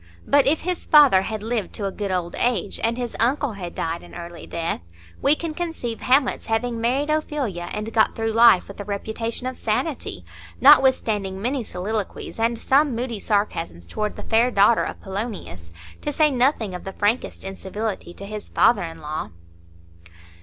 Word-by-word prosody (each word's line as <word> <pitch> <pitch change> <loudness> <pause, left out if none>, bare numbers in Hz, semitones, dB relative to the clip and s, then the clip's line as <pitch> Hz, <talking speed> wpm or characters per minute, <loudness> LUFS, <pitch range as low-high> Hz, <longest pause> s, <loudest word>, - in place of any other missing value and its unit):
But 285 -1 +4
if 305 +3 +2
his 360 0 -3
father 285 -11 +7
had 215 +2 -4
lived 225 -2 -2
to 205 - -3
a 195 - -1
good 200 0 -4
old 180 -2 -2
age, 230 -6 0
and 230 +1 +1
his 245 -2 -4
uncle 260 +2 +1
had 180 -4 -7
died 165 +1 -2
an - - -13
early 170 0 -8
death, 165 - -3 0.4
we 285 - +4
can 325 0 -4
conceive 320 -9 -4
Hamlet's 260 0 +2
having 230 +1 -1
married 270 +6 +1
Ophelia, 275 - -2
and 215 +1 -4
got 220 - +3
through 225 0 -1
life 230 -5 +6
with 200 - -11
a - - -3
reputation 220 +4 -4
of 255 0 -4
sanity, 250 +7 -2 0.3
notwithstanding 220 -9 +4
many 250 +4 -1
soliloquies, 205 +3 -4
and 230 +1 +1
some 275 +2 +2
moody 235 -2 -3
sarcasms 195 - -1
toward 210 - -3
the - - -8
fair 230 +2 +3
daughter 210 0 +4
of - - -5
Polonius, 190 - -6 0.3
to 295 - -2
say 300 +1 +3
nothing 245 -6 +1
of 180 - -6
the 195 - -6
frankest 210 +5 -1
incivility 195 0 -5
to 195 - -9
his 210 +1 -7
father 230 -4 +4
in 165 -1 -6
law. 155 +1 -4
225 Hz, 175 wpm, -23 LUFS, 195-255 Hz, 0.4 s, father